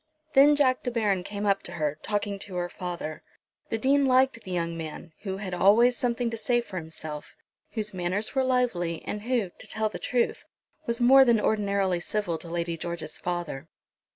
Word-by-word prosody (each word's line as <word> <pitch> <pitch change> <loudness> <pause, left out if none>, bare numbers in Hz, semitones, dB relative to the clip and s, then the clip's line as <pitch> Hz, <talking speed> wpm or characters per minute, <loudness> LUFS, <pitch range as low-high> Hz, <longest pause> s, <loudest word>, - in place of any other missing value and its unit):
Then 290 +2 +7
Jack 260 -3 +3
De - - -2
Baron 210 -6 +1
came 205 +2 -4
up 200 -1 +2
to 175 - -7
her, 150 -2 -2
talking 205 -1 -2
to 195 -1 -8
her 175 0 -1
father. 175 -4 -5 0.5
The 225 - 0
Dean 275 +4 +3
liked 255 -2 +3
the 190 - -11
young 170 -2 -1
man, 160 0 -7
who 190 -2 -4
had 195 -2 -5
always 220 +7 +5
something 240 -2 -1
to 230 - -4
say 240 +2 +1
for 205 -6 -6
himself, 160 -2 -6 0.4
whose 210 -2 -2
manners 185 +4 -2
were 265 - +2
lively, 235 -11 0
and 210 - -3
who, 230 -5 0
to - - -11
tell 220 0 -1
the - - -7
truth, 245 -1 0 0.4
was 235 +1 0
more 265 +3 +8
than 235 -4 +4
ordinarily 200 -4 +1
civil 175 -2 -2
to - - -10
Lady 170 0 -2
George's 165 -2 -5
father. 175 -5 -4
200 Hz, 190 wpm, -27 LUFS, 175-235 Hz, 0.5 s, more